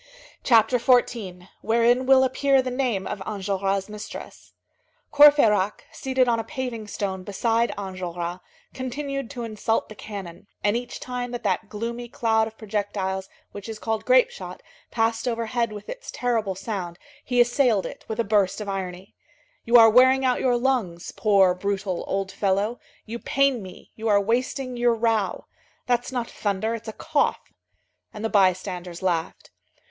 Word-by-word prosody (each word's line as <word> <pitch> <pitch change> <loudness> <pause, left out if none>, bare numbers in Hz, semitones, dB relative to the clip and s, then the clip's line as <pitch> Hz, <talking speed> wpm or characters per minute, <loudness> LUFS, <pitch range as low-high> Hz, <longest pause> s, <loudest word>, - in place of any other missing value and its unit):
CHAPTER 230 0 +4
XIV—WHEREIN 235 +1 +1
WILL 265 -1 +6
APPEAR 265 +1 +2
THE 255 - -3
NAME 245 -7 -1
OF 195 - -5
ENJOLRAS' 195 -1 -2
MISTRESS 210 0 -9 0.6
Courfeyrac, 255 -10 +5
seated 260 -2 0
on 230 -1 +2
a - - -2
paving 240 -4 -5
stone 195 -2 -3
beside 225 +4 0
Enjolras, 180 -3 -5 0.3
continued 275 0 -4
to 245 -4 -6
insult 225 0 -1
the - - -8
cannon, 200 -4 -9 0.2
and 205 +1 +2
each 245 0 -4
time 250 -1 -4
that 245 0 -6
that 210 - -1
gloomy 235 +3 -5
cloud 220 -2 +1
of 220 0 -12
projectiles 200 -3 -3 0.2
which 205 +2 -8
is 220 - -5
called 220 0 -2
grape - - +4
shot 485 - -9 0.3
passed 225 +1 0
overhead 235 0 -1
with 210 -1 -9
its - - -8
terrible 225 -6 -1
sound 190 -3 -5 0.3
he 245 -1 0
assailed 240 -4 +3
it - - -8
with 220 - -5
a - - +3
burst 205 -2 +1
of 210 - -6
irony. 190 -1 -5 0.5
"You 235 +1 +6
are 225 -1 +9
wearing 260 +3 +5
out 250 -1 +2
your 245 -2 +2
lungs, 240 -10 -1
poor, 195 -4 +4
brutal, 190 -1 -2
old 195 0 -2
fellow, 200 +4 0 0.3
you 230 +2 -6
pain 275 -3 +1
me, 185 -1 -12
you 225 +1 -4
are 205 -2 +5
wasting 250 +4 -1
your 240 -1 +3
row. 225 -4 0 0.4
That's 245 0 0
not 245 -2 -2
thunder, 210 +2 -2
it's 230 0 -7
a - - -3
cough." 305 +3 -1 0.6
And 215 +1 -6
the - - 0
bystanders 185 -3 0
laughed. 170 -3 -2
225 Hz, 155 wpm, -24 LUFS, 195-245 Hz, 0.6 s, are